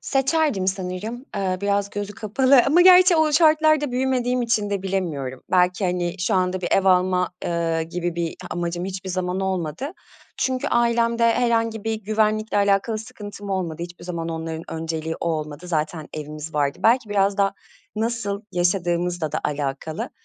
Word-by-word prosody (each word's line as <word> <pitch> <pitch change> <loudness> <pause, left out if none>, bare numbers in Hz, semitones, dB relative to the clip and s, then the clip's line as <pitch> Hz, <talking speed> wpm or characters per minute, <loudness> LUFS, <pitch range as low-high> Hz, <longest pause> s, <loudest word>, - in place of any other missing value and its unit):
Seçerdim 270 - +1
sanırım, 190 +6 -3
eee, 190 -2 -1
biraz 200 0 0
gözü 205 0 -4
kapalı 255 +5 +4
ama 305 +6 +5
gerçi 365 0 +7
o 315 -1 +3
şartlarda 310 -2 +4
büyümediğim 250 -1 0
için 220 -3 0
de 200 -2 -2
bilemiyorum. 160 -10 -3
Belki, 180 +2 +2
hani, 175 -1 -1
şu 175 - 0
anda 185 0 +1
bir 175 - -2
ev 195 - +3
alma, 180 -1 +3 0.2
eee, 165 -1 0
gibi 175 +1 -3
bir 170 -1 -2 0.2
amacım 175 0 -3
hiçbir 190 0 -5
zaman 180 +1 -2
olmadı. 190 - -2 0.4
Çünkü 260 -1 -1
ailemde 235 -1 +2
herhangi 230 -3 0
bir 225 0 0
güvenlikle 215 0 0
alakalı 200 +2 +2
sıkıntım 205 -2 -9
olmadı, 170 -4 -2
hiçbir 175 0 -9
zaman 170 -2 -4
onların 160 0 -4
önceliği 160 0 -3
o 170 - -1
olmadı. 155 +1 -4
Zaten 155 -1 -2
evimiz 155 +1 -7
vardı, 145 -1 0
belki 235 0 +3
biraz 200 -1 +2
da 195 0 +2 0.4
nasıl 215 -3 -2
yaşadığımızla 175 -2 0
da - - -1
alakalı. 145 +1 -3
190 Hz, 155 wpm, -23 LUFS, 170-230 Hz, 0.4 s, gerçi